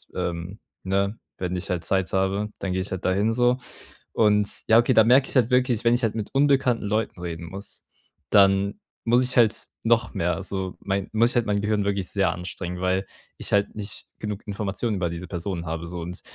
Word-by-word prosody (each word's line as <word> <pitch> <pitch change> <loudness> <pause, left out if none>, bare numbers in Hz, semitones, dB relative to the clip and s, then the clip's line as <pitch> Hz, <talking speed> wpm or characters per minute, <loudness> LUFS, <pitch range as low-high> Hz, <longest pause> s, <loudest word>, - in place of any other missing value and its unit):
ähm, 90 +2 -4 0.2
ne 100 +3 0 0.2
wenn 90 0 -3
ich 90 - -4
halt 85 -2 -1
Zeit 95 +1 0
habe, 95 +2 0
dann 95 -2 -2
gehe 95 - 0
ich 95 - -5
halt 95 0 -4
dahin, 100 +4 +2
so. 125 +1 +2 0.5
Und, 105 -2 +3 0.2
ja, 110 +1 +7
okay, 120 - +3
da 110 - +7
merke 130 +4 +5
ich - - -8
halt 125 -2 +3
wirklich, 125 -3 +2
wenn 115 0 +4
ich 120 - +2
halt 110 -1 +1
mit 110 -2 -3
unbekannten 135 -4 +3
Leuten 105 -3 -1
reden 85 -1 -5
muss, 95 +4 -9 0.5
dann 100 0 +4 0.3
muss 120 +2 +4
ich 130 0 0
halt 115 -3 +3 0.2
noch 115 0 +2
mehr 85 +2 -1
so 95 -1 -4
mei 100 0 -1
muss 115 +2 +4
ich - - -7
halt 120 - +2
mein 100 -1 +1
Gehirn 105 -1 0
wirklich 100 -2 -1
sehr 95 -3 +1
anstrengen, 90 0 -6
weil 95 +1 +1 0.3
ich - - -4
halt 100 0 +2
nicht 105 -1 -7
genug 105 -1 -5
Informationen 105 +1 -2
über 90 -2 0
diese 85 +2 -6
Personen 85 0 -4
habe 80 +1 -3
so, 90 0 -6
und 90 +2 -7
100 Hz, 210 wpm, -25 LUFS, 90-115 Hz, 0.5 s, ja